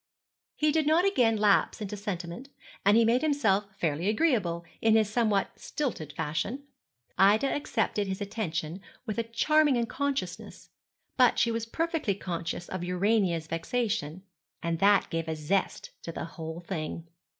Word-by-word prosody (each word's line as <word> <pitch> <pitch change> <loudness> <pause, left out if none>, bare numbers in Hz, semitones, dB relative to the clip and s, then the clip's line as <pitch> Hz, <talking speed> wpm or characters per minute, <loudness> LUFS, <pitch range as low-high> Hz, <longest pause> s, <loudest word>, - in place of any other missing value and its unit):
He 305 0 +2
did 310 -1 +1
not 325 +4 +4
again 245 - +3
lapse 205 -1 +3
into 210 -1 -4
sentiment, 195 +4 -5 0.3
and 205 +3 +5
he 230 - +5
made 240 +3 +3
himself 225 -10 +2
fairly 165 -1 -1
agreeable, 210 - +1 0.2
in 220 -1 +4
his 220 -2 +4
somewhat 215 -2 +1
stilted 225 - -3
fashion. 195 - -3 0.6
Ida 205 +6 +5
accepted 225 -7 -1
his 190 0 -3
attention 185 -5 -3 0.2
with 215 -2 -3
a - - +1
charming 290 +5 +3
unconsciousness; 245 -5 -3 0.5
but 250 -2 +5
she 235 - +3
was 230 0 -3
perfectly 320 - -1
conscious 175 -2 -4
of 185 -2 -4
Urania's 180 -2 +1
vexation, 165 - -2 0.4
and 165 -1 -1
that 200 0 +4
gave 165 0 -2
a 160 - -2
zest 165 +6 -1
to 165 - -6
the - - -5
whole 165 0 -7
thing. 165 -2 -5
205 Hz, 150 wpm, -28 LUFS, 170-235 Hz, 0.6 s, and